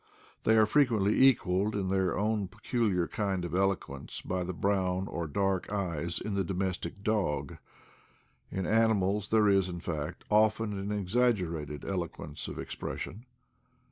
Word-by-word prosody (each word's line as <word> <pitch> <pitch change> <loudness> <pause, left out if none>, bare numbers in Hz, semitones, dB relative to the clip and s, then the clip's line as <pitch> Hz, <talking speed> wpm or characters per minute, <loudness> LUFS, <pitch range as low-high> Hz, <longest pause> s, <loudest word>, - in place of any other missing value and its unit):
They 110 - +5
are 110 - +7
frequently 110 -5 +3
equaled 105 -6 +4
in 95 -2 -1
their 95 -2 +1
own 105 0 0
peculiar 100 -6 0
kind 95 -4 -1
of 85 - -6
eloquence 95 -8 -1
by 90 0 -2
the 90 - -3
brown 95 0 0
or 85 -4 -3
dark 95 +4 0
eyes 85 -4 -2
in 105 - -4
the 100 0 +1
domes 95 0 -1
tic 90 +4 -7
dog. 105 -9 0 0.9
In 95 -1 -3
animals 105 -2 +2
there 110 -1 +4
is, 95 -2 +3
in 85 -1 -5
fact, 80 -4 -4
often 110 0 +3
an 100 0 -4
exag 110 +4 +2
gerated 80 -6 -5
eloquence 85 -5 -4
of - - -6
expression. 115 +7 -6
95 Hz, 150 wpm, -30 LUFS, 90-105 Hz, 0.9 s, are